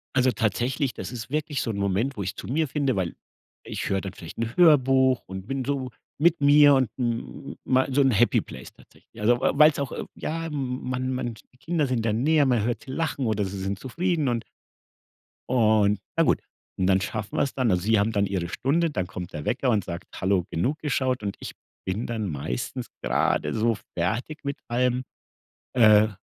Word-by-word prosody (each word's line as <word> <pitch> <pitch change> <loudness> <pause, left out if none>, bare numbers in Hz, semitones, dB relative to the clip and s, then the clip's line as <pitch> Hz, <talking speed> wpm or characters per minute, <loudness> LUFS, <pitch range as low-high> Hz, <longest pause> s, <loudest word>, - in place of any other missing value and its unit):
Also, 130 -1 +4
tatsächlich, 120 +5 0
das - - -6
ist 120 -1 -7
wirklich 150 -1 -1
so - - -3
'n 105 - -5
Moment, 100 +7 0
wo 100 - -2
ich 95 +3 -4
zu - - -8
mir 155 +5 0
finde, 140 -2 0
weil 90 -4 -2 0.5
ich - - -4
höre 95 0 +1
dann 95 0 -6
vielleicht 85 -2 -10
'n 115 +1 -3
Hörbuch 135 -6 +5
und 95 0 -7
bin 135 -1 -2
so 135 -2 -2 0.3
mit 165 +1 +3
mir 145 0 +7
und 130 -3 +2
m 115 - -3
mei 130 0 +2
so 140 +2 +3
'n 135 - +4
Happy 120 +2 +3
Place 65 0 -11
tatsächlich. - - -17
Also, 120 +3 +3
weil 130 - +1
weil's 150 0 +6
auch 140 -3 -2
irg - - -6
ja, 165 +1 -3
m 155 - -7 0.3
m - - -4
man 130 0 -1
man 120 -2 -3 0.2
die - - -24
Kinder 160 +2 0
sind 125 -4 -1
da 110 - +2
näher, 145 +7 +3
man 120 -5 +2
hört 120 +3 -3
lachen 140 -2 -2
oder 105 -2 0
sie 95 +1 -5
sind 95 +1 -2
zufrieden 160 - -1
und 120 -2 0 1.1
und 110 -4 +3 0.2
na - - +4
gut. - - +2 0.4
Und 95 - +1
dann 95 0 +3
schaffen 105 0 -4
wir - - +3
's 140 - -6
dann. 125 -4 +2
Also, 90 -1 +1
sie 110 +1 +3
haben 105 +2 +1
dann 100 -2 +1
ihre 95 -3 -2
Stunde, 160 - +1
dann 95 -9 -2
kommt 90 -2 -7
der 75 - -6
Wecker 130 +1 0
und 105 -4 +1
sagt: 85 0 -6 0.2
„Hallo, 95 -2 +2
genug 130 - 0
geschaut“. 130 -5 -1
Und 100 -1 -3
ich - - -7 0.3
bin 95 +5 -2
dann 110 -4 -2
meistens 70 -5 -4
gerade - - +1
so 115 +1 +2 0.2
fertig 115 - -2
mit 140 0 -2
allem. 125 +1 +1 0.7
Äh, 110 -3 +6
120 Hz, 210 wpm, -25 LUFS, 100-135 Hz, 1.1 s, mir